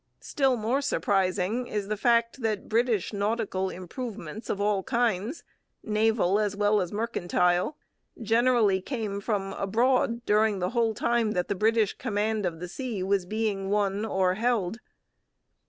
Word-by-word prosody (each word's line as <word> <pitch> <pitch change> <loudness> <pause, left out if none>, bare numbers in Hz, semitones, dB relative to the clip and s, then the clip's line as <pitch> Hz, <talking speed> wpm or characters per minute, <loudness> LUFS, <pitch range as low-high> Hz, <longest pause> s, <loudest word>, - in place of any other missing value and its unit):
Still 270 -3 +1
more 235 +6 0
surprising 205 -3 0
is 205 -2 -3
the 215 - -1
fact 235 +3 +2
that 215 -3 -2
British 225 -3 +1
nautical 205 -2 -1
improvements 195 - -7
of 200 - -1
all 205 -1 +1
kinds, 235 - -1 0.4
naval 215 -2 +2
as 205 -1 0
well 205 0 +2
as 180 - -3
mercantile, 180 - 0 0.4
generally 225 -3 +3
came 210 -4 -4
from 195 -2 -2
abroad 235 +3 +1
during 210 0 +3
the 180 -1 -2
whole 230 -2 +1
time 235 -1 +1
that 180 0 -1
the - - +2
British 220 +1 +2
command 215 -3 -1
of 165 -2 -5
the 180 - -5
sea 225 -1 -4
was 190 -1 0
being 210 -2 -2
won 205 0 +1
or 190 -4 +1
held. 225 -1 0
210 Hz, 145 wpm, -27 LUFS, 195-230 Hz, 0.4 s, generally